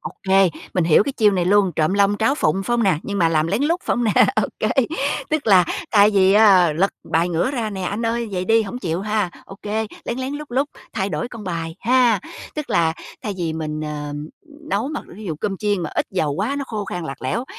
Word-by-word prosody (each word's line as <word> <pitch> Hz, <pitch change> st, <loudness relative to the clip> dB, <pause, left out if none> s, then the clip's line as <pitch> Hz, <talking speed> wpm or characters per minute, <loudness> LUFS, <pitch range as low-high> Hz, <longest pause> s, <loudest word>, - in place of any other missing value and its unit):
OK, 190 Hz, 0 st, -2 dB, 0.4 s
mình 180 Hz, -, +2 dB
hiểu 160 Hz, +3 st, +5 dB
cái 280 Hz, -, -3 dB
chiêu 220 Hz, -5 st, +4 dB
này 180 Hz, -2 st, +1 dB
luôn, 195 Hz, 0 st, +3 dB
trộm 155 Hz, +4 st, +2 dB
long 200 Hz, 0 st, +3 dB
tráo 230 Hz, +5 st, +2 dB
phụng, 190 Hz, -, 0 dB
phải 240 Hz, -, -2 dB
hông 235 Hz, -, +1 dB
nè? 185 Hz, -7 st, +2 dB
Nhưng 200 Hz, -1 st, -4 dB
mà 165 Hz, -3 st, +4 dB
làm 155 Hz, -1 st, +1 dB
lén 200 Hz, +9 st, 0 dB
lút, 335 Hz, +5 st, +1 dB
phải -, -, 0 dB
hông 245 Hz, -, 0 dB
nè? 215 Hz, -, +2 dB, 0.2 s
OK. -, -, -1 dB, 0.6 s
Tức 310 Hz, -5 st, -1 dB
là 185 Hz, -4 st, +6 dB, 0.3 s
thay 210 Hz, -1 st, +6 dB
vì 195 Hz, -1 st, +4 dB
á 195 Hz, -6 st, +6 dB
lật 185 Hz, +6 st, +1 dB, 0.2 s
bài 170 Hz, +2 st, +2 dB
ngửa 175 Hz, +8 st, 0 dB
ra 235 Hz, -6 st, -2 dB
nè: 195 Hz, -, -5 dB
''Anh 205 Hz, +5 st, -2 dB
ơi, 230 Hz, 0 st, -1 dB
vậy 185 Hz, -1 st, -2 dB
đi 225 Hz, +2 st, +3 dB
hổng 220 Hz, +4 st, -6 dB
chịu 175 Hz, -6 st, -2 dB
ha.'' 210 Hz, -2 st, -1 dB, 0.2 s
OK, 195 Hz, -, -13 dB, 0.4 s
lén 240 Hz, -, -3 dB
lén, 260 Hz, +1 st, -3 dB
lút 300 Hz, +1 st, -6 dB
lút 270 Hz, +4 st, +1 dB, 0.3 s
thay 195 Hz, 0 st, -1 dB
đổi 240 Hz, -, -3 dB
con 230 Hz, -4 st, -9 dB
bài 165 Hz, -2 st, -4 dB
ha. 240 Hz, -3 st, +3 dB, 0.3 s
Tức 300 Hz, -2 st, -5 dB
là 165 Hz, -1 st, +2 dB, 0.3 s
thay 210 Hz, -, -3 dB
vì 165 Hz, -2 st, -1 dB
mình, 155 Hz, -1 st, -4 dB
ờm, 150 Hz, 0 st, -5 dB, 0.4 s
nấu 215 Hz, +7 st, 0 dB
mà 300 Hz, -, -4 dB, 0.2 s
ví 215 Hz, -, -9 dB
dụ 165 Hz, -, -3 dB
cơm 195 Hz, -2 st, -2 dB
chiên 205 Hz, -2 st, -1 dB
mà -, -, -4 dB
ít -, -, 0 dB
dầu 155 Hz, -6 st, 0 dB
quá 215 Hz, -, -2 dB
nó 280 Hz, -, -3 dB
khô 210 Hz, -2 st, -4 dB
khan 175 Hz, -3 st, -5 dB
lạc 135 Hz, -3 st, -7 dB
lẽo, 220 Hz, -, -1 dB
200 Hz, 240 wpm, -21 LUFS, 170-225 Hz, 0.6 s, là